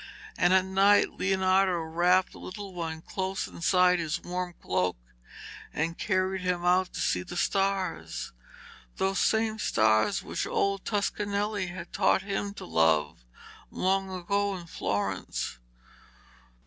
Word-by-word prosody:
And 175 Hz, -, +3 dB
at 185 Hz, 0 st, +4 dB
night 195 Hz, +2 st, +4 dB
Leonardo 190 Hz, 0 st, +3 dB
wrapped 175 Hz, +3 st, +2 dB
the -, -, -13 dB
little 195 Hz, 0 st, -8 dB
one 165 Hz, -2 st, -5 dB
close 190 Hz, 0 st, -3 dB
inside 180 Hz, +1 st, +3 dB
his 160 Hz, -1 st, -2 dB
warm 180 Hz, 0 st, -4 dB
cloak 90 Hz, -3 st, 0 dB, 0.7 s
and 165 Hz, +2 st, -2 dB
carried 185 Hz, +1 st, 0 dB
him 180 Hz, -1 st, -1 dB
out 180 Hz, +1 st, +3 dB
to -, -, -5 dB
see 90 Hz, -, +1 dB
the 175 Hz, -, -7 dB
stars 190 Hz, -, -1 dB, 0.6 s
those 195 Hz, -1 st, 0 dB
same 220 Hz, 0 st, +1 dB
stars 110 Hz, -, +2 dB
which -, -, -3 dB
old 200 Hz, -1 st, 0 dB
Toscanelli 205 Hz, -1 st, -1 dB
had 175 Hz, -1 st, -8 dB
taught 190 Hz, -1 st, +3 dB
him 200 Hz, 0 st, -3 dB
to -, -, -8 dB
love 80 Hz, -5 st, +1 dB, 0.5 s
long 190 Hz, +1 st, 0 dB
ago 195 Hz, +2 st, -1 dB
in 175 Hz, -, -9 dB
Florence. 100 Hz, -, -3 dB
185 Hz, 130 wpm, -28 LUFS, 170-195 Hz, 0.7 s, at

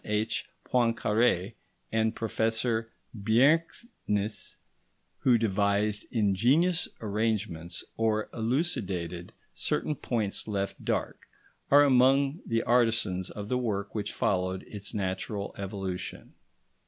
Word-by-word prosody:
H. 105 Hz, +2 st, -1 dB, 0.2 s
Poincaré 115 Hz, -5 st, +2 dB, 0.4 s
and 110 Hz, 0 st, +1 dB
Professor 115 Hz, 0 st, 0 dB, 0.2 s
Bjerknes, 115 Hz, -, 0 dB, 0.6 s
who 125 Hz, -3 st, +4 dB
devised 105 Hz, -1 st, +1 dB
ingenious 125 Hz, -, +2 dB
arrangements 105 Hz, -6 st, -1 dB
or 110 Hz, -1 st, +1 dB
elucidated 100 Hz, -, -2 dB, 0.2 s
certain 155 Hz, -, -1 dB
points 110 Hz, -9 st, -2 dB
left 100 Hz, -2 st, -3 dB
dark, -, -, -2 dB, 0.4 s
are 145 Hz, +1 st, +7 dB
among 135 Hz, +3 st, +4 dB
the 115 Hz, 0 st, +1 dB
artisans 115 Hz, -6 st, +2 dB
of 105 Hz, -1 st, -7 dB
the 125 Hz, +3 st, 0 dB
work 100 Hz, -4 st, -2 dB
which 105 Hz, -1 st, -2 dB
followed 95 Hz, -1 st, 0 dB
its 100 Hz, -1 st, -6 dB
natural 100 Hz, +1 st, -3 dB
evolution. 95 Hz, -2 st, -5 dB
110 Hz, 95 wpm, -29 LUFS, 100-120 Hz, 0.6 s, are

